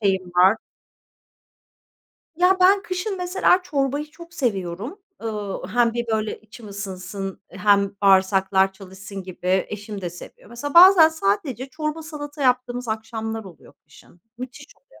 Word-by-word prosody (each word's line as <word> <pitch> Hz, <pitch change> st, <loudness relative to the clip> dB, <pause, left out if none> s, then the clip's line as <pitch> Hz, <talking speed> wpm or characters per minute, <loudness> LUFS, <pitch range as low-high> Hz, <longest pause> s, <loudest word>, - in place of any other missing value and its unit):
şeyim 190 Hz, -3 st, +1 dB
var. 190 Hz, +4 st, +6 dB, 1.8 s
Ya, 360 Hz, +2 st, +4 dB
ben 390 Hz, +2 st, +5 dB
kışın 380 Hz, +1 st, -3 dB
mesela 360 Hz, 0 st, +2 dB
çorbayı 290 Hz, -2 st, -2 dB
çok 340 Hz, +2 st, -14 dB
seviyorum. 210 Hz, -, -3 dB, 0.2 s
Iıı, 210 Hz, -3 st, -4 dB
hem 240 Hz, -1 st, +2 dB
bir 240 Hz, 0 st, -2 dB
böyle 215 Hz, -1 st, -2 dB
içim 220 Hz, +1 st, -13 dB
ısınsın 195 Hz, -1 st, -6 dB
hem 200 Hz, 0 st, +2 dB
bağırsaklar 190 Hz, 0 st, +4 dB
çalışsın 190 Hz, 0 st, -10 dB
gibi. 185 Hz, 0 st, -1 dB
Eşim 210 Hz, 0 st, -7 dB
de 175 Hz, -2 st, -4 dB
seviyor. 175 Hz, -, -13 dB
Mesela 280 Hz, +5 st, -6 dB
bazen 350 Hz, -2 st, +9 dB
sadece 260 Hz, -1 st, -2 dB
çorba, 305 Hz, +3 st, -4 dB
salata 295 Hz, -2 st, -7 dB
yaptığımız 250 Hz, -1 st, 0 dB
akşamlar 220 Hz, 0 st, -4 dB
oluyor 175 Hz, -7 st, -14 dB
kışın. 155 Hz, +3 st, -20 dB, 0.2 s
Müthiş 255 Hz, +3 st, -8 dB
oluyor -, -, -24 dB
225 Hz, 130 wpm, -23 LUFS, 195-300 Hz, 1.8 s, bazen